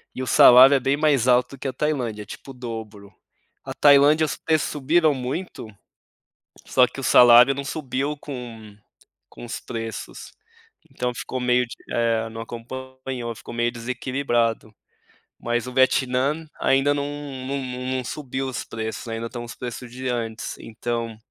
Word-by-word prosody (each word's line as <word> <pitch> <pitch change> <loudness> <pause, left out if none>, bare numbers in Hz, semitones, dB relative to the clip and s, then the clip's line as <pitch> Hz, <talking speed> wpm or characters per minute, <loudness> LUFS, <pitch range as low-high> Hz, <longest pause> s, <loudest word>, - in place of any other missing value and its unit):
E 130 - -4
o 130 - -4
salário 130 +4 +8
é - - +3
bem 135 +2 +1
mais 145 -5 +2
alto 125 +2 +2
que 135 - -5
o - - -1
da - - -25
Tailândia. 125 -8 -1
É - - -15
tipo 135 - -10
o - - -11
dobro. 110 -5 -8 0.5
A - - -5
Tailândia, 145 +2 +5
os - - -3
preços 155 -2 0
subiram 155 +2 +2
muito, 130 +1 -5 1.0
só 125 -1 +4
que 135 - -10
o - - -6
salário 125 +2 +7
não 140 - -4
subiu 140 0 -3
com 115 -7 -9 0.5
com - - -11
os 120 - -5
preços. 115 -2 -7 0.6
Então 125 -2 -2
ficou 130 +2 -5
meio 125 0 +2
de - - -9 0.2
É, 115 -1 0
não 115 0 -7
acompanhou. 130 0 -7
Ficou 120 - -10
meio 120 0 0
desequilibrado. 120 -2 -2 0.7
Mas 120 +1 -2
o 125 - -7
Vietnã 130 +4 +2
ainda 135 +2 +3
não 145 0 -2 0.4
não 140 +1 -2 0.4
não 130 - -3
subiu 135 0 -4
os 130 - -4
preços. 110 +1 -6
Ainda 115 0 -4
estão 120 0 -7
os 120 - -9
preços 120 0 -7
de 130 +1 -6
antes. 115 -2 -4
Então, 115 0 -4
125 Hz, 165 wpm, -23 LUFS, 115-135 Hz, 1.0 s, salário